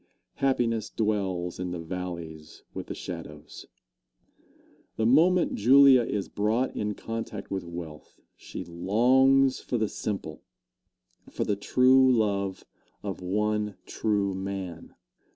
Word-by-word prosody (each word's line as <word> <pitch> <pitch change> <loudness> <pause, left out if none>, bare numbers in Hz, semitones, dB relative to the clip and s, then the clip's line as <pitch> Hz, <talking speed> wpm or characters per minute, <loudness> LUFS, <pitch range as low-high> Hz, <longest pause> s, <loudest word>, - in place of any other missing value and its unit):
Happiness 115 -5 0
dwells 95 -6 -2
in 90 0 -3
the 90 -1 -4
valleys 85 -3 -7
with - - -6
the - - -5
shadows. 75 -3 -9 1.3
The 110 - 0
moment 170 +9 +4
Julia 135 +3 +6
is 105 -4 -3
brought 110 +5 -1
in 105 -1 -2
contact 115 -3 -6
with 95 -1 -2
wealth, 85 -3 -9 0.2
she - - -8
longs 130 +10 +3
for 125 - -3
the 110 -1 0
simple 100 -1 -5 0.9
for - - -2
the 105 - 0
true 130 +5 +4
love 100 -5 0 0.4
of 100 -3 -5
one 105 +2 -1
true 100 -3 -1
man. 95 -3 -6
105 Hz, 115 wpm, -27 LUFS, 90-120 Hz, 1.3 s, Julia